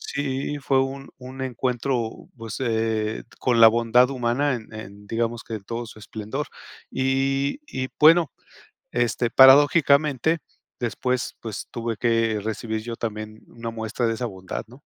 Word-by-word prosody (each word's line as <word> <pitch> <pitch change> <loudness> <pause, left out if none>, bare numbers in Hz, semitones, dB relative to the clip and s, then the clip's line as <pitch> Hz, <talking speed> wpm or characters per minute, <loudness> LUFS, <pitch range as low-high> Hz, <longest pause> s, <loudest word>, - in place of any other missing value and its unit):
Sí, 140 +1 -3
fue 135 -1 +2
un 135 +1 -5
un 130 +1 -8
encuentro, 125 -2 -2
pues, 115 -3 -7
eh, 110 -2 -1 0.2
con 120 -2 +2
la 115 - +11
bondad 120 +2 +4
humana 130 +2 0
en 110 -2 -8
en, 105 -1 -10
digamos 115 +1 -1
que 115 - -6
en 105 - -7
todo 115 +2 -4
su 110 - -12
esplendor 110 +7 -5 0.4
y 135 - 0
y 130 0 -3
bueno, 160 0 +6 0.6
este 120 -1 0
paradójicamente, 145 +2 +5 0.4
después, 125 +1 -2
pues 110 -3 -6
tuve 115 -1 -3
que 115 -1 +1
recibir 110 0 -3
yo 115 +1 -6
también 110 -1 -5
una 115 -1 -6
muestra 115 +1 -2
de 115 - +1
esa 120 +2 -3
bondad, 95 -4 -6
¿no? 130 +4 -15
120 Hz, 150 wpm, -24 LUFS, 110-135 Hz, 0.6 s, la